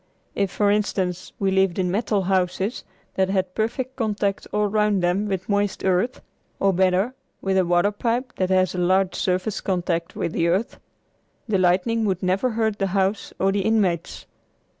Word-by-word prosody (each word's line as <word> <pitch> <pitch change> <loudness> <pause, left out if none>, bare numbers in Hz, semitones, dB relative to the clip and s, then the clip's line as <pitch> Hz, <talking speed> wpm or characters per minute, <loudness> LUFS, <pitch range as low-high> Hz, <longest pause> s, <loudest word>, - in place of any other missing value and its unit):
If, 200 -1 0
for 205 +2 +1
instance, 190 -3 -1
we 195 -1 0
lived 190 -2 +2
in 180 -2 0
metal 205 -1 0
houses 190 +3 0 0.3
that 190 0 +1
had 190 -1 0
perfect 240 +5 -2
contact 210 -4 -1
all 210 0 +1
round 210 -2 +1
them 185 +4 +1
with 190 -2 -3
moist 205 -1 0
earth, 190 +7 +1 0.4
or 195 -1 +3
better, 190 +6 +2 0.3
with 195 0 -1
a 190 -1 +3
water 175 +3 +3
pipe 240 +4 -2
that 185 -1 0
has 185 -1 +2
a 180 - -3
large 185 +1 +2
surface 185 +3 -1
contact 175 -3 -2
with - - -2
the 170 - +1
earth, 190 +7 0 0.7
the 205 -4 +1
lightning 185 +6 +2
would 190 -3 -1
never 190 +7 +1
hurt 220 -2 -1
the 195 - +1
house 195 +2 0
or 195 +1 +2
the 200 0 0
inmates. 190 -6 0
195 Hz, 175 wpm, -23 LUFS, 185-210 Hz, 0.7 s, or